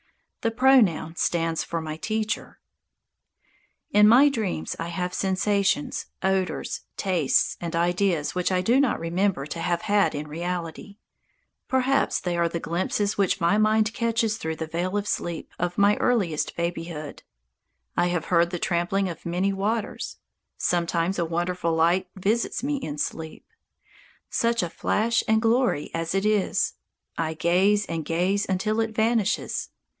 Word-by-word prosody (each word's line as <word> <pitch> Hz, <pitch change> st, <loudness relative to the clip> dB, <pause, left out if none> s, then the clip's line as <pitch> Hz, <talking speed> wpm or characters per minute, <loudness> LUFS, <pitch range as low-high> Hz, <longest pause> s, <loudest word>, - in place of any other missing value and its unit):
The 230 Hz, -, +1 dB
pronoun 225 Hz, -10 st, +3 dB
stands 165 Hz, -1 st, 0 dB
for 170 Hz, -, -3 dB
my 155 Hz, -1 st, -5 dB
Teacher. 215 Hz, +4 st, -3 dB, 1.3 s
In 210 Hz, 0 st, +6 dB
my 260 Hz, +6 st, +7 dB
dreams 205 Hz, -, -2 dB
I 165 Hz, -, -3 dB
have 180 Hz, +1 st, -3 dB
sensations, 205 Hz, +9 st, 0 dB, 0.2 s
odours, 190 Hz, -1 st, -1 dB, 0.2 s
tastes 175 Hz, -8 st, +1 dB
and 170 Hz, -1 st, -3 dB
ideas 175 Hz, -2 st, +1 dB
which 180 Hz, +1 st, 0 dB
I 185 Hz, -1 st, +2 dB
do 235 Hz, +8 st, +3 dB
not 275 Hz, -5 st, +2 dB
remember 175 Hz, -2 st, 0 dB
to 160 Hz, +3 st, -6 dB
have 170 Hz, 0 st, -1 dB
had 205 Hz, -5 st, +2 dB
in 150 Hz, +1 st, -4 dB
reality. 175 Hz, +4 st, -5 dB, 0.7 s
Perhaps 260 Hz, +1 st, +2 dB
they 175 Hz, -1 st, -2 dB
are 170 Hz, 0 st, +1 dB
the 170 Hz, -, -3 dB
glimpses 190 Hz, +6 st, -1 dB
which 195 Hz, 0 st, +2 dB
my 175 Hz, +5 st, +3 dB
mind 215 Hz, 0 st, +3 dB
catches 230 Hz, -2 st, 0 dB
through 160 Hz, -5 st, -3 dB
the 160 Hz, -, -4 dB
veil 175 Hz, +5 st, -2 dB
of 205 Hz, 0 st, -2 dB
sleep 170 Hz, -4 st, -3 dB
of 175 Hz, 0 st, -2 dB
my 200 Hz, +1 st, +5 dB
earliest 195 Hz, -11 st, 0 dB
babyhood. 165 Hz, -3 st, -4 dB, 0.7 s
I 175 Hz, -, +2 dB
have 175 Hz, -2 st, -1 dB
heard 170 Hz, -1 st, +3 dB
"the 175 Hz, -, -3 dB
trampling 175 Hz, +3 st, 0 dB
of 170 Hz, -3 st, -7 dB
many 185 Hz, +3 st, 0 dB
waters." 210 Hz, +3 st, -2 dB, 0.4 s
Sometimes 170 Hz, +1 st, 0 dB
a 170 Hz, -, +1 dB
wonderful 170 Hz, 0 st, -1 dB
light 170 Hz, +3 st, +2 dB
visits 215 Hz, +6 st, -1 dB
me 285 Hz, +1 st, 0 dB
in 150 Hz, -, -5 dB
sleep. 160 Hz, +2 st, -4 dB, 0.9 s
Such 235 Hz, -3 st, +1 dB
a 175 Hz, -, -2 dB
flash 230 Hz, +2 st, +1 dB
and 220 Hz, 0 st, +4 dB
glory 230 Hz, -, +1 dB
as 165 Hz, +2 st, -2 dB
it 195 Hz, +1 st, +1 dB
is! 210 Hz, -2 st, +1 dB, 0.5 s
I 160 Hz, -1 st, -1 dB
gaze 190 Hz, +6 st, +3 dB
and 165 Hz, -1 st, -3 dB
gaze 185 Hz, +6 st, 0 dB
until 215 Hz, +4 st, 0 dB
it 225 Hz, -1 st, -1 dB
vanishes. 220 Hz, -1 st, 0 dB
185 Hz, 150 wpm, -25 LUFS, 170-215 Hz, 1.3 s, my